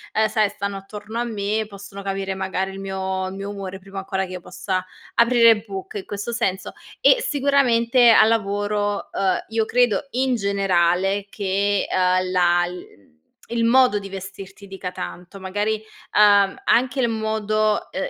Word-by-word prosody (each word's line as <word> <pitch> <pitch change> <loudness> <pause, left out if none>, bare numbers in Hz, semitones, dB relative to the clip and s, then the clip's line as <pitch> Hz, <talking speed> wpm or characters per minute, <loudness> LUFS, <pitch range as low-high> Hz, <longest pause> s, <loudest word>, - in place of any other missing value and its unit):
uhm, 220 0 +3
sai, 215 -1 +1
stanno 200 0 -4
attorno 210 +3 -8
a - - +1
me, 215 -1 -2
possono 200 0 -10
capire, 195 -1 -3
magari, 190 0 -2
il 195 - -8
mio 190 -1 -3
il 190 - -8
mio 195 +1 -5
umore 190 -2 -7
prima 195 +1 -8
ancora 190 0 -2
che 185 - -11
io 180 - -6
possa 185 +1 -3 0.3
aprire 235 -2 +5
bocca, 195 0 -7
in 190 - -6
questo 205 +4 -5
senso. 195 -5 -2 0.3
E - - +5
sicuramente 255 - +3
al 220 -1 +7
lavoro, 205 -1 -1
uhm, 190 -2 0
io 225 0 +1
credo, 245 +3 +1
in 255 0 +1
generale, 195 -1 +1
che, 200 0 0
uhm, 185 0 +1
la 175 -1 +3
l 180 - -7
mhmm, 100 - -15 0.4
il 235 0 -1
modo 245 -2 +4
di 195 0 -9
vestirti 195 +1 -9
dica 195 -1 -6
tanto. 180 +2 -8
Magari, 205 +3 -1 0.4
uhm, 205 -2 +5
anche 260 +3 +2
il 240 -2 +2
modo, 215 -1 0
uhm, 190 - -3
200 Hz, 165 wpm, -22 LUFS, 190-220 Hz, 0.4 s, al